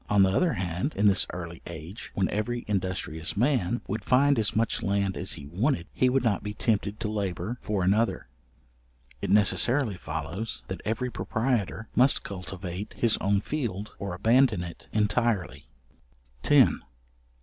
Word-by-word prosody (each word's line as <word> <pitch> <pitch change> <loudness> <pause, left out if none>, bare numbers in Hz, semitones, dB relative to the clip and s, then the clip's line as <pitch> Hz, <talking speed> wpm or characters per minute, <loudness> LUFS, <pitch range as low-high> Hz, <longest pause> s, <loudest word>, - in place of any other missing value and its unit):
On 100 -2 +5
the 95 - +3
other 175 - +3
hand, 90 - -2
in 105 - +1
this 100 -3 +5
early 85 -1 -7
age, 85 +5 -8
when 95 - +2
every 120 +3 -2
industrious 95 -4 -2
man 120 -3 +1
would 105 +2 -3
find 135 +2 +4
as 105 - 0
much 115 +2 +1
land 100 -2 0
as - - -2
he 70 - -8
wanted, 90 - 0
he 130 - +3
would 130 +1 +2
not 110 -5 +1
be 105 0 -5
tempted 105 -2 0
to 110 - -2
labour 105 +2 -3
for 100 -3 -1
another. 100 - +1 0.9
It - - -3
necessarily 105 +3 +3
follows, 80 +8 -4
that 95 - -5
every 125 +3 -1
proprietor 110 -3 -1
must 130 +3 +4
cultivate 95 0 -6
his 115 -2 +2
own 100 0 +2
field 105 -9 -3
or 100 -3 -4
abandon 115 -1 +3
it 85 -1 -9
entirely. 105 - 0 0.8
§10. - - +5
105 Hz, 155 wpm, -27 LUFS, 90-115 Hz, 0.9 s, On